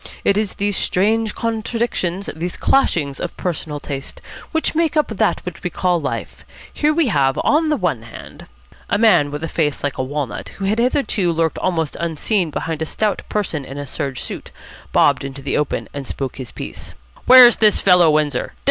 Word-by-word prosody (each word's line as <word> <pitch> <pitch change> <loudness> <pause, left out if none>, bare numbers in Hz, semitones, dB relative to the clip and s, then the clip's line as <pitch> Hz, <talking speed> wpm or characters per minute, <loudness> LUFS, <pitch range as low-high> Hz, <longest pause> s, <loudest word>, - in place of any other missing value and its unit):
It 200 - +3
is 210 -1 -1
these 205 -1 -1
strange 220 +3 +1
contradictions, 225 -5 -2
these 170 +2 -4
clashings 155 - +1
of 175 - -5
personal 155 -4 -3
taste, 140 -1 -6 0.3
which 320 - 0
make 320 -1 +1
up 300 - +1
what 180 -4 -1
we 180 - -1
call 175 -1 0
life. 140 - -5 0.3
Here 300 0 +2
we 310 -4 +2
have, 135 -7 +2
on 315 +1 +3
the 300 - +2
one - - -1
hand - - -12 0.2
" - - -24
A - - +2
man 195 -10 +4
with 150 +2 -6
a - - -1
face 150 -4 -1
like 145 -2 -2
a - - +1
walnut, 140 -3 -4
who 195 - -3
had 210 +4 +1
hitherto 235 -7 +1
lurked 165 -1 0
almost 165 -5 -1
unseen 170 +3 0
behind 160 +1 -4
a - - 0
stout 210 +2 -1
person 180 -8 -2
in 135 +1 -9
a 145 - -4
serge 135 -1 -4
suit, - - -7 0.4
bobbed - - +3
into 135 0 -7
the 140 - -1
open, 150 - -1
and 140 -2 -6
spoke 135 -2 -4
his 130 -3 -7
piece. - - -8 0.3
"Where's 250 -2 +9
this 215 -2 +4
fellow 180 -3 +5
Windsor? 150 -1 0
175 Hz, 190 wpm, -19 LUFS, 145-220 Hz, 0.4 s, Where's